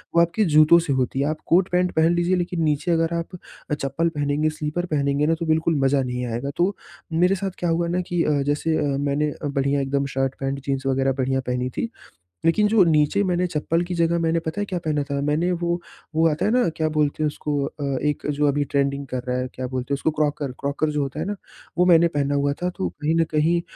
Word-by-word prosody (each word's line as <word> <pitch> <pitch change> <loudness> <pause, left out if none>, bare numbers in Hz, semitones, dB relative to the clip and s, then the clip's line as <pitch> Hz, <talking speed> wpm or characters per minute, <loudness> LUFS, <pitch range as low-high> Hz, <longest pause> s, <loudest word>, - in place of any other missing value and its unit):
वो 170 - +6
आपके 170 +6 +2
जूतों 155 +1 +6
से 160 -5 -1
होती 130 0 -1
है। 140 - +2
आप 155 - -2
कोट-पैंट 180 0 +2
पहन 160 +2 +4
लीजिए 175 +2 +2
लेकिन 175 -1 -2
नीचे 150 +2 0
अगर 165 0 +1
आप 170 +2 -4 0.5
चप्पल 150 +5 0
पहनेंगे 150 0 0
स्लीपर 155 +3 -3
पहनेंगे 145 -3 0
ना 165 - +3
तो 170 - -2
बिल्कुल 160 +1 +1
मज़ा 135 +1 +2
नहीं 125 0 -3
आएगा। 120 +4 -3
तो 185 +3 +1 0.4
मेरे 180 +4 +3
साथ 195 0 -3
क्या 175 - 0
हुआ 170 +1 +1
ना 180 +2 0
कि 175 -1 -1
अ, 150 - +1
जैसे 150 +3 0
अ, 140 -2 0
मैंने 145 +1 0
बढ़िया 140 0 0
एकदम 140 +1 0
शर्ट-पैंट 135 +1 -1
जीन्स 135 -1 -2
वगैरह 135 0 +1
बढ़िया 130 +1 0
पहनी 125 0 -1
थी। 230 - -1 0.6
लेकिन 210 +6 +4
जो 215 -2 +5
नीचे 160 +4 +3
मैंने 180 -1 +1
चप्पल 165 0 -1
की 180 +1 -5
जगह 170 0 +2
मैंने 165 0 +1
पता 165 +5 -4
है - - -1
क्या 185 -3 -3
पहना 155 -3 -1
था 140 0 -3
मैंने 150 +5 +1
वो 175 0 -1 0.4
वो 165 +1 +4
आता 150 - -1
है 210 - +2
ना 245 -3 +3
क्या 155 -1 0
बोलते 150 0 0
हैं - - +3
उसको 145 -1 -2
अ, 145 - -7 0.2
एक 150 -1 -1
जो 145 +1 +1
अभी 145 +1 +1
ट्रेंडिंग 140 0 -1
कर 130 -1 -3
रहा 125 0 0
है 125 - -2
क्या 130 - -5
बोलते 130 +2 -3
हैं - - +3
उसको 155 +3 0
क्रॉकर, 150 -2 -1
क्रॉकर 140 +2 -1
जो 150 -1 -1
होता 140 +1 -4
है 160 - -2
ना, 205 +2 -3 0.4
वो 180 - +4
मैंने 170 -1 +6
पहना 145 -3 -1
हुआ 140 0 +1
था 180 - 0
तो 90 - -1
कहीं 155 +2 +1
न - - +5
कहीं 165 +3 +2
155 Hz, 235 wpm, -23 LUFS, 140-170 Hz, 0.6 s, वो